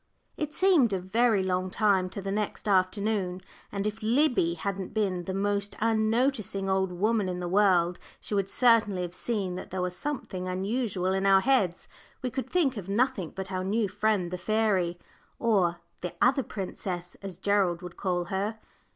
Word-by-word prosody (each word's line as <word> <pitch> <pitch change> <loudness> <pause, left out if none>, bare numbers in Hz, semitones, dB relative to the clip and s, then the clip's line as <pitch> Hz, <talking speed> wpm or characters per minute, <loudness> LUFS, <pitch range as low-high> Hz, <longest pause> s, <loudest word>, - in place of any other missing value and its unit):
It 300 -1 -3
seemed 315 - +4
a 190 - 0
very 210 +2 +2
long 185 0 0
time 190 -2 +2
to 195 +1 -7
the 195 - -3
next 210 +1 -3
afternoon, 190 -1 +1 0.3
and 200 0 -3
if 210 +2 -3
Liddy 230 - +2
hadn't 195 +3 -4
been 185 -5 0
the 190 - -3
most 200 +1 -1
unnoticing 220 -2 +1
old 190 -1 +1
woman 205 +2 +1
in 180 0 -3
the 175 - -3
world, 180 -2 +3 0.2
she - - -5
would 195 -1 0
certainly 220 -6 +3
have 175 -1 -5
seen 200 -2 -2
that 185 - -7
there 190 - -4
was 180 0 -2
something 190 -8 -4
unusual 190 0 -1
in 190 +1 +1
our 195 -1 +6
heads. 200 -8 +1 0.4
We 250 - -1
could 265 +1 -4
think 290 -9 +1
of 195 -2 -6
nothing 215 -4 0
but 190 0 -5
our 185 0 -2
new 210 +3 +1
friend 200 -2 0
the 180 - -4
fairy, 195 -4 +1 0.4
or 185 -7 +2 0.2
"the 180 - -5
other 270 +3 +4
princess," 185 -5 -5
as 195 -3 -7
Gerald 190 -3 +1
would 180 -1 -8
call 180 -2 -1
her. 205 +3 -1
195 Hz, 175 wpm, -28 LUFS, 185-220 Hz, 0.4 s, our